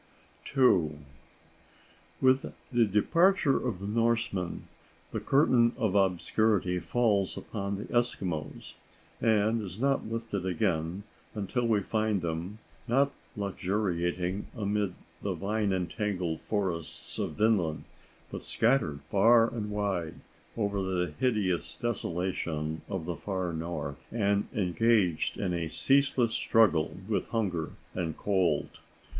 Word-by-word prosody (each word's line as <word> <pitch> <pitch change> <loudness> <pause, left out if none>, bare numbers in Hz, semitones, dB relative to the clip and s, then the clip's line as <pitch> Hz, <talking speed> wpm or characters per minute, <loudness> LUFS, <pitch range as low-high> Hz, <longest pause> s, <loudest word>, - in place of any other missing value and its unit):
*II.* 85 - +4 1.3
With 130 +1 +3 0.2
the 120 -3 +4
departure 165 - +3
of 115 -8 -2
the 100 - -6
Norsemen, 115 -4 0 0.5
the - - -2
curtain 125 -4 +4
of 110 -7 0
obscurity 95 0 +2
falls 100 +2 +1
upon 100 -2 -4
the 100 - -5
Eskimos, 95 -10 -2 0.5
and 110 0 +3
is 95 -3 -7
not 135 +1 +1
lifted 115 -4 -3
again 90 0 -1 0.3
until 115 +4 -1
we 110 -3 +3
find 110 -2 0
them, 85 +5 -3 0.3
not 135 +4 +3 0.3
luxuriating 95 -2 -1
amid 105 -3 -1 0.3
the - - -2
vine 105 0 0
entangled 90 -2 -2
forests 90 -6 -2
of - - -2
Vinland, 100 -8 +2 0.5
but - - -5
scattered 110 - +1
far 115 +3 +5
and 105 -3 -3
wide 100 -6 -2 0.4
over 100 -2 0
the 90 -3 -1
hideous 105 -9 0
desolation 85 -7 -2
of 95 -5 -3
the 85 0 -3
far 95 -1 -3
north, 80 -3 -4
and 100 -3 +1
engaged 100 -2 +2
in 90 - -1
a 85 -2 -1
ceaseless 135 - +2
struggle 95 -10 +3
with 110 - -1
hunger 95 -8 -1 0.2
and 85 -4 -3
cold. 95 -7 0
100 Hz, 115 wpm, -29 LUFS, 90-115 Hz, 1.3 s, far